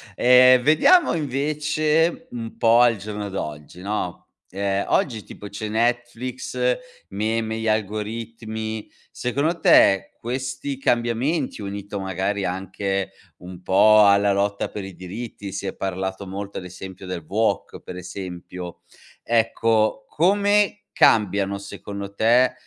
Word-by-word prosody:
Ehm 125 0 +7
vediamo 155 - +5
invece 150 +2 0
un 115 -2 -7
po' 115 +1 +5
al 120 -2 +4
giorno 105 0 -5
d'oggi, 75 -2 -6
no. 100 -3 -3 0.3
Ehm, 100 +1 -1
oggi 110 -6 +1
tipo 105 - -10
c'è 105 +1 -5
Netflix, 120 +2 -2 0.5
meme, 110 +1 -1
gli 115 0 -3
algoritmi, 110 +1 -3 0.2
secondo 145 +8 -1
te, 95 -8 +5
questi 130 +3 -4
cambiamenti, 125 +2 0
unito 100 0 -5
magari 95 +1 -2
anche 95 +1 -2 0.3
un 90 0 -11
po' 105 +3 +6
alla 100 0 +4
lotta 100 0 0
per 105 - -6
i 95 -2 -9
diritti, 100 +2 -7
si 100 +1 -5
è - - -4
parlato 95 +1 -4
molto 100 +1 -5
ad 90 - -10
esempio 95 +1 -9
del 90 -3 -5
woke, 105 +1 -1
per - - -9
esempio, 90 -1 -8 0.4
ecco 110 -1 +1
come 205 +4 +2
cambiano 100 -2 +3
secondo 100 0 -8
te, 120 +5 +4
105 Hz, 120 wpm, -23 LUFS, 95-120 Hz, 0.5 s, Ehm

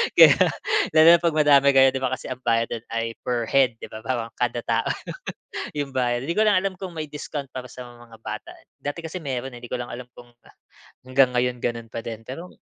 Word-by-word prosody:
Kaya - - +9 0.6
lalo 155 0 +8
na - - -13
'pag 170 -2 0
madami 145 -2 +5
kayo 135 0 +7
'di 135 - -3
ba. 130 - 0
Kasi 130 - -9
ang 130 - -5
bayad 115 0 +2
do'n 115 0 -5
ay 115 0 -1
per 120 -1 0
head 130 -4 +4
'di - - -8
ba, 110 - -7
parang 115 -2 -2
kada 120 -1 0
tao 115 0 0 0.9
yung 140 -2 -3
bayad. 120 0 0
'Di 170 - -1
ko 215 - +4
lang 210 -3 +4
alam 195 0 -2
kung 185 0 -7
may 155 -2 -5
discount 145 -1 -6
para 125 -1 -6
sa 125 -2 -9
mga 120 -2 -15
bata - - -7
eh. - - -18
Dati 145 +3 -5
kasi 165 +1 -6
meron 130 -2 -4
eh, 120 - -11
'di 120 - -8
ko 125 - -2
lang 120 - -4
alam 125 +1 -8
kung 120 -1 -14 0.8
hanggang 130 0 +4
ngayon 125 0 0
gano'n 115 -1 -2
pa 115 - -4
din. 115 -2 -6
Pero, 165 +8 -7
130 Hz, 230 wpm, -24 LUFS, 120-145 Hz, 0.9 s, Kaya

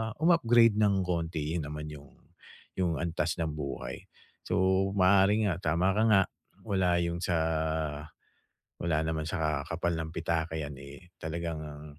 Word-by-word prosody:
um-upgrade 120 -10 +4
ng 100 -3 +3
konti 85 -3 -2
rin - - -3
naman 75 +1 -6
'yong 70 -1 -11 0.7
'yong 85 -3 +1
antas 80 -1 -1
ng 80 -2 -2
buhay. 70 -4 -6 0.4
So 95 +1 +2
maaari 100 +3 +4
nga, 95 - +1 0.2
tama 90 +4 +2
ka 105 +3 +1
nga, 100 -3 +6 0.4
wala 90 -4 +2
'yong 85 0 -2
sa 90 -1 +1 1.5
wala 80 -2 +1
naman 80 -1 -2
sa 75 -3 -1
kapal 85 +1 -2
ng 80 -1 -4
pitaka 80 -1 -2
'yan, 70 -2 -6
eh, 70 +5 -12
talagang 85 0 -4
ang 75 0 -9
85 Hz, 145 wpm, -30 LUFS, 80-95 Hz, 1.5 s, nga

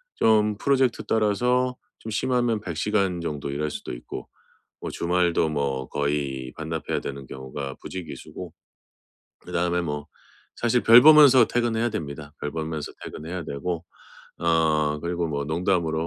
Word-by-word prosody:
좀 105 -2 +3
프로젝트 130 -2 +1
따라서 125 +4 +1 0.2
좀 110 - -7
심하면 120 0 +1
100 85 -6 -5
시간 95 -2 0
정도 75 -4 -4
일할 75 +2 -2
수도 - - -6
있고 - - -8 0.5
뭐 - - -4
주말도 85 -1 +1
뭐 70 -3 -2
거의 70 -3 -2
반납해야 80 0 -3
되는 70 -1 -6
경우가 65 +1 -6
부지기수고 90 -5 -8 0.9
그다음에 90 0 -1
뭐 75 -3 -4 0.5
사실 120 +1 +1
별 115 +2 +9
보면서 145 -5 +8
퇴근해야 120 0 0
됩니다. 75 -7 -6
별 75 - -3
보면서 80 -1 -4
퇴근해야 85 +3 -6
되고 80 +4 -3 0.6
어 80 -3 +2
그리고 85 0 -2
뭐 70 -2 -2
농담으로 80 0 0
85 Hz, 300 characters per minute, -25 LUFS, 75-110 Hz, 0.9 s, 별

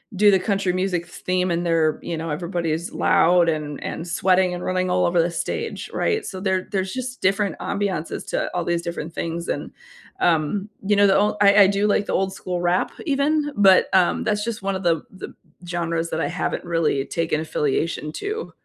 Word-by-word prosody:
do 205 +2 +5
the 190 - +4
country 195 -2 0
music 180 -2 -1
theme 180 +1 -1
and 170 +1 -1
they're 160 -2 +2 0.3
everybody's 170 0 -2
loud 175 0 +4
and 150 -2 -3
and 170 - -5
sweating 185 +1 +2
and 175 - -5
running 185 0 0
all 180 0 +2
over 175 -1 +3
the 170 +1 0
stage, 445 - -4
right? 435 0 0
So, 185 -1 -6
there 190 -2 0
there's 190 -1 -1
just 255 -1 -5
different 195 +1 +1
ambiences 195 -6 -3
to - - -1
all 175 - -1
these 170 0 0
different 170 -1 -5
things, 170 +1 -4
and, - - -3 0.5
um, 170 +5 +1 0.2
you 205 +1 +3
know, 205 0 +6
the 195 - +4
ol 210 +1 +1
I 200 0 +6
I - - +5
do 200 +1 +1
like 205 0 +2
the - - -2
old-school 185 -2 -2
rap 175 +1 +1
even, 295 +1 +1
but, 195 -2 +6
um, 185 -2 +3
that's 210 -1 0
just 225 -3 -4
one 195 0 -1
of 190 - -5
the 165 -3 +2
the 190 - -9 0.3
genres 170 -1 -2
that 160 - -1
I - - 0
haven't 175 0 -3
really 160 -5 0
taken 165 -2 -1
affiliation 150 0 -1
to. 430 +3 -4
180 Hz, 195 wpm, -22 LUFS, 170-200 Hz, 0.5 s, know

